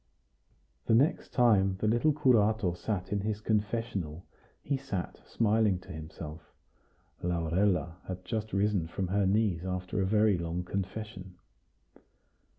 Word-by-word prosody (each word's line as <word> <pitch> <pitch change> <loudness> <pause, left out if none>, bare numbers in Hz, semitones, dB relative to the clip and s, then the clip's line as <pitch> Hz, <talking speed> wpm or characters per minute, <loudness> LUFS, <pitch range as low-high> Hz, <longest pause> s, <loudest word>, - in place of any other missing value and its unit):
The 110 - +5
next 140 +7 +2
time 100 -6 +4
the 110 - -1
little 120 +8 +3
curato 110 - +3
sat 95 0 -3
in 100 - +1
his 105 +1 -2
confessional, 105 -6 -2 0.4
he 140 - 0
sat 130 -10 -4
smiling 110 -3 +2
to - - -12
himself. 80 0 -8 0.8
Laurella 85 0 0
had 90 0 -6
just 110 -2 -3
risen 100 -4 +1
from 90 +2 -3
her 100 0 +2
knees 100 -4 +1
after 90 +1 -2
a - - +2
very 105 -2 +3
long 85 +1 -3
confession. 95 0 -5
100 Hz, 130 wpm, -30 LUFS, 90-110 Hz, 0.8 s, The